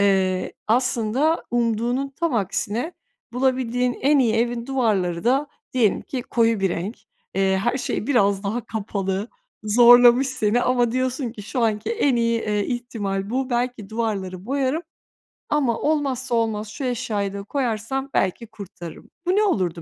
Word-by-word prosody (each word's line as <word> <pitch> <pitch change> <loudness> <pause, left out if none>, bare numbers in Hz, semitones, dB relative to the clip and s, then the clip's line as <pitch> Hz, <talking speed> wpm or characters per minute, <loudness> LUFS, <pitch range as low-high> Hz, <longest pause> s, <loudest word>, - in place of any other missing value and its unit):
Eee, 190 -2 +2
aslında 250 +6 +1
umduğunun 240 +3 0
tam 325 -1 -2
aksine, 225 - -1 0.4
bulabildiğin 250 -1 +1
en 285 +2 +4
iyi 230 -4 +3
evin 235 +1 0
duvarları 200 -10 0
da 270 +4 +2 0.3
diyelim 230 -6 +2
ki 255 -2 -5
koyu 230 -3 +1
bir 195 - +2
renk. 190 +7 -3 0.4
Eee, 190 0 +2
her 240 +2 +1
şey 230 - -3
biraz 200 -7 +2
daha 220 +4 -2
kapalı, 200 -1 -3 0.3
zorlamış 245 +3 +7
seni 240 -2 +1
ama 245 -2 +2
diyorsun 255 -1 -1
ki 210 - -9
şu 245 +4 -3
anki 220 - 0
en 285 - +2
iyi, 230 -1 +1
eee, 210 -1 -1
ihtimal 210 -5 -3
bu. 260 +1 -1
Belki 240 -3 -2
duvarları 200 -4 -3
boyarım 275 +4 0 0.7
ama 265 -6 +1
olmazsa 265 -5 0
olmaz 220 -2 0
şu 240 +7 -7
eşyayı 215 -5 -2
da 200 0 -5
koyarsam 265 +2 -2
belki 195 +5 0
kurtarırım. 190 -6 -10 0.2
Bu 360 - +2
ne 425 - +4
olurdu 180 - 0
235 Hz, 150 wpm, -23 LUFS, 205-255 Hz, 0.7 s, zorlamış